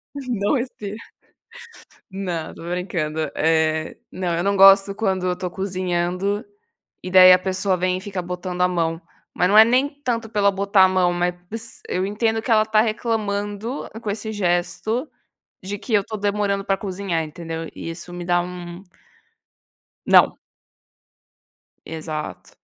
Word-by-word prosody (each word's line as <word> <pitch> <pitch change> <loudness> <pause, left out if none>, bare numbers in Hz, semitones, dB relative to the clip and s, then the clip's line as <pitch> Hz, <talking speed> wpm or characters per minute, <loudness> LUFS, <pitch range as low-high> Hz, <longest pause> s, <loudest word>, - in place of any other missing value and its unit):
Não 250 -2 -1
esteja, 210 -4 -6 1.1
não, 180 -4 -4
tô - - -12
brincando. 165 -4 -2
Eh, 160 0 +1 0.2
não, 180 -2 -2
eu 175 - -1
não 200 - +2
gosto 195 +1 +7
quando 190 -4 -1
eu 180 - -1
tô 180 - -4
cozinhando, 185 +2 -2 0.6
e 185 - -6
daí 185 0 +9
a 180 - +7
pessoa 190 +1 0
vem 185 +1 0
e - - -9
fica 195 -2 -5
botando 180 0 -4
a 180 - +4
mão, 165 -2 -1 0.3
mas 180 - +2
não 210 +2 +5
é 220 - +11
nem 255 +5 +2
tanto 230 -4 -2
por 210 - -3
ela 200 0 +5
botar 195 0 +3
a - - +5
mão, 185 -1 +2
mas 180 +6 -4
eu 185 +1 -1
entendo 225 +2 0
que 230 - -6
ela 215 -1 +5
tá 215 0 +3
reclamando 215 +1 -2
com 215 -3 -3
esse 220 +1 -4
gesto, 195 - -1 0.6
de 200 +2 -5
que 225 - -7
eu 205 - +4
tô 215 - -5
demorando 205 -1 -1
pra 195 -1 +1
cozinhar 190 -4 -2
entendeu? 165 0 -6
E - - -6
isso 175 +1 -9
me 175 0 -6
dá 175 0 +2
um 175 0 -8 1.2
Não. - - +5 1.5
Exato. 155 -1 -6
190 Hz, 155 wpm, -22 LUFS, 175-205 Hz, 1.5 s, é